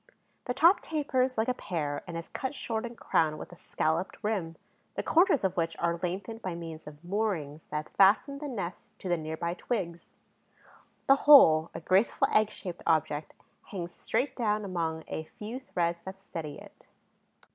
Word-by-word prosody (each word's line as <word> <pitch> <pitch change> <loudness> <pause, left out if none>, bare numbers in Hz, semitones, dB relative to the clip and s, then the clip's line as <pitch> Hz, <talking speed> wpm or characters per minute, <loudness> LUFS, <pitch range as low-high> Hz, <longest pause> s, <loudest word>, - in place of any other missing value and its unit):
The 250 - -2
top 335 +8 +6
tapers 265 -5 0
like 220 - +1
a 255 - +2
pear 155 -10 -3
and 170 -1 -5
is 165 - -6
cut 265 +2 -4
short 230 -3 -3
and 235 0 -11
crowned 155 -1 +1
with - - -9
a - - -11
scalloped 165 +2 -1
rim, 190 -7 -1 0.4
the - - -2
corners 345 - +4
of 190 -1 +1
which 165 -1 -1
are 170 0 0
lengthened 190 +5 -4
by 185 -4 -3
means 165 -2 -8
of 150 +1 -11
moorings 175 -7 -2
that 150 0 -4
fasten 215 +8 +4
the 295 - -5
nest 195 -9 -6
to - - -7
the 175 - +2
near 160 -1 -5
by 170 +1 -2
twigs. 175 -5 -4 1.0
The 275 - +6
whole, 160 - +9
a - - -3
graceful 190 +6 +3
egg 215 0 +4
shaped 180 -5 -7
object, 155 -2 +1 0.3
hangs 175 -5 -5
straight 265 0 -1
down 215 -3 0
among 165 -4 -2
a 160 - -4
few 225 +5 -5
threads 170 -9 -2
that 190 0 -7
steady 165 -6 -6
it. - - -15
185 Hz, 180 wpm, -29 LUFS, 165-230 Hz, 1.0 s, whole